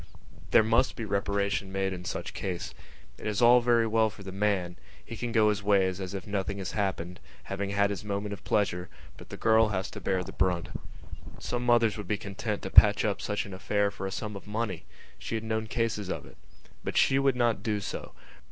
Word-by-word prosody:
There -, -, +6 dB
must 115 Hz, +4 st, +2 dB
be 115 Hz, -, -4 dB
reparation 100 Hz, -1 st, -1 dB
made 95 Hz, 0 st, -1 dB
in 90 Hz, -1 st, -7 dB
such -, -, -4 dB
cases. 90 Hz, -3 st, -4 dB, 0.5 s
It -, -, -5 dB
is 105 Hz, -1 st, -1 dB
all 120 Hz, +1 st, +7 dB
very 120 Hz, -1 st, +3 dB
well 110 Hz, 0 st, +3 dB
for 100 Hz, -, -12 dB
the 95 Hz, -, -7 dB
man: 95 Hz, -3 st, 0 dB, 0.3 s
he -, -, -7 dB
can 120 Hz, +1 st, -4 dB
go 110 Hz, -2 st, +4 dB
his 105 Hz, 0 st, 0 dB
ways 95 Hz, -2 st, +2 dB
as 95 Hz, +1 st, -5 dB
if 95 Hz, -, -5 dB
nothing 100 Hz, -1 st, -2 dB
had 95 Hz, -, -4 dB
happened, 95 Hz, -4 st, -2 dB, 0.2 s
having 100 Hz, 0 st, -3 dB
had 100 Hz, 0 st, +2 dB
his 100 Hz, -1 st, -4 dB
moment 100 Hz, 0 st, -3 dB
of 100 Hz, -, -9 dB
pleasure, 90 Hz, -4 st, 0 dB, 0.3 s
but -, -, -13 dB
the -, -, -7 dB
girl 110 Hz, 0 st, +4 dB
has 95 Hz, -1 st, -2 dB
to 105 Hz, -, -8 dB
bear 95 Hz, 0 st, 0 dB
the -, -, -8 dB
brunt. 90 Hz, -3 st, 0 dB, 0.7 s
Some 120 Hz, 0 st, -3 dB
mothers 115 Hz, -3 st, +4 dB
would 105 Hz, -, -6 dB
be 105 Hz, -, 0 dB
content 100 Hz, +1 st, -4 dB
to -, -, -5 dB
patch -, -, +7 dB
up -, -, -1 dB
such 105 Hz, -, -2 dB
an 100 Hz, -, -9 dB
affair 100 Hz, +2 st, 0 dB
for 95 Hz, -, -5 dB
a -, -, -5 dB
sum 105 Hz, +1 st, -4 dB
of 100 Hz, -, -9 dB
money; 105 Hz, -4 st, -3 dB, 0.3 s
she -, -, -4 dB
had 110 Hz, -, -3 dB
known 110 Hz, 0 st, -2 dB
cases 110 Hz, -4 st, -1 dB
of -, -, -4 dB
it. -, -, -16 dB, 0.5 s
But -, -, -3 dB
she 135 Hz, -, +4 dB
would 135 Hz, -2 st, +3 dB
not 120 Hz, -4 st, +1 dB
do 105 Hz, -1 st, -1 dB
so. 100 Hz, -, -6 dB
100 Hz, 220 wpm, -29 LUFS, 95-110 Hz, 0.7 s, all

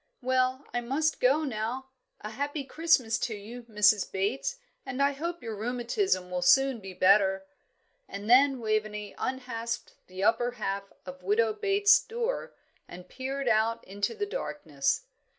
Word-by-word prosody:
"Well, 255 Hz, +1 st, +1 dB
I 240 Hz, -, 0 dB
must 290 Hz, +6 st, 0 dB
go 275 Hz, +5 st, +3 dB
now. 255 Hz, +1 st, -3 dB, 0.3 s
'A 215 Hz, -, -6 dB
happy 285 Hz, +4 st, -3 dB
Christmas 270 Hz, -5 st, +2 dB
to 225 Hz, -, -2 dB
you,' 230 Hz, +4 st, -9 dB
Mrs. 210 Hz, -1 st, +3 dB
Bates, 220 Hz, -, -1 dB, 0.3 s
and 255 Hz, -, -6 dB
I 280 Hz, 0 st, +4 dB
hope 335 Hz, +2 st, -5 dB
your 225 Hz, -2 st, -4 dB
rheumatism 235 Hz, -, -1 dB
will 180 Hz, 0 st, -1 dB
soon 270 Hz, +7 st, +4 dB
be 190 Hz, -2 st, -9 dB
better." 190 Hz, +1 st, +3 dB, 0.6 s
And 200 Hz, +1 st, -7 dB
then 265 Hz, +2 st, +5 dB
Waveney 215 Hz, -2 st, -2 dB
unhasped 240 Hz, -3 st, -4 dB
the 185 Hz, +1 st, -6 dB
upper 240 Hz, +3 st, +2 dB
half 195 Hz, -4 st, -4 dB
of 185 Hz, 0 st, -9 dB
Widow 215 Hz, +4 st, +2 dB
Bates's 405 Hz, -1 st, +4 dB
door, 475 Hz, +2 st, -3 dB, 0.3 s
and 180 Hz, 0 st, -11 dB
peered 270 Hz, +1 st, -4 dB
out 225 Hz, 0 st, +2 dB
into 200 Hz, -, -3 dB
the 415 Hz, -1 st, -2 dB
darkness. 165 Hz, -, -2 dB
235 Hz, 150 wpm, -28 LUFS, 205-275 Hz, 0.6 s, then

